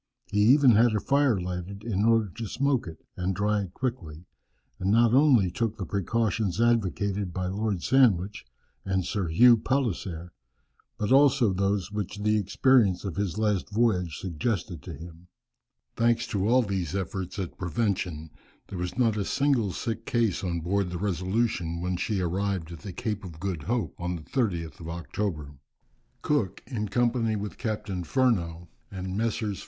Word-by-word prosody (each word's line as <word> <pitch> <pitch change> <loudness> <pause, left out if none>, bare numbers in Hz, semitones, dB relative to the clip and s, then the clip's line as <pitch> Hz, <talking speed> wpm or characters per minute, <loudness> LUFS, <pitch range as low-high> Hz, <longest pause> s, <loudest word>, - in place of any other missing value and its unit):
He 105 - +1
even 130 +5 +6
had 115 0 +4
a - - +2
fire 140 -3 +2
lighted 90 +3 -5
in 105 -3 0
order 115 -2 +4
to 110 +5 -7
smoke 135 0 0
it, 80 - -10
and 95 +1 -2
dry 105 +2 +1
it 95 -1 -8
quickly, 90 -11 -4 0.5
and 95 - -1
not 115 +2 +4
only 130 - +5
took 110 +3 -2
the 95 - -4
precautions 100 +1 -1
advocated 100 -4 +1
by 90 +1 -3
Lord 100 -1 -2
Sandwich, 105 -7 +3 0.4
and 95 -2 -1
Sir 95 -3 -2
Hugh 115 +9 +6
Palliser, 95 -10 -2 0.7
but 105 +3 -2
also 135 -6 +5
those 100 +1 0
which 105 -1 -4
the 105 0 +3
experience 105 -1 +3
of 95 - -4
his 100 -3 -2
last 105 -3 0
voyage 100 -7 +1
suggested 90 - -3
to 85 - -8
him. 85 +3 -12 0.7
Thanks 115 0 +2
to 100 0 0
all 125 +2 +4
these 95 -4 -3
efforts 95 -1 -4
at 95 -4 -5
prevention 90 -4 -2 0.4
there 95 - -6
was 90 +4 -4
not 115 -4 +2
a 100 - 0
single 130 -3 +1
sick 115 +3 -4
case 115 -7 +1
on 85 -2 -2
board 95 +2 0
the 90 - -4
Resolution 95 -2 -1
when 90 +1 -2
she 95 +2 -1
arrived 90 -1 -2
at 85 - -8
the 100 - -7
Cape 105 +3 -4
of 85 -4 -9
Good 90 -3 -3
Hope 115 - -2
on 90 0 -2
the 80 - -8
30th 85 - -2
of 80 -1 -7
October. 85 -3 -4 0.7
Cook, 110 -11 0
in 110 -5 -4
company 120 -1 +1
with 105 0 -5
Captain 105 -5 -3
Furneaux, 85 -9 0 0.2
and 95 -1 -5
Messrs. 110 -2 -1
100 Hz, 165 wpm, -27 LUFS, 90-115 Hz, 0.7 s, even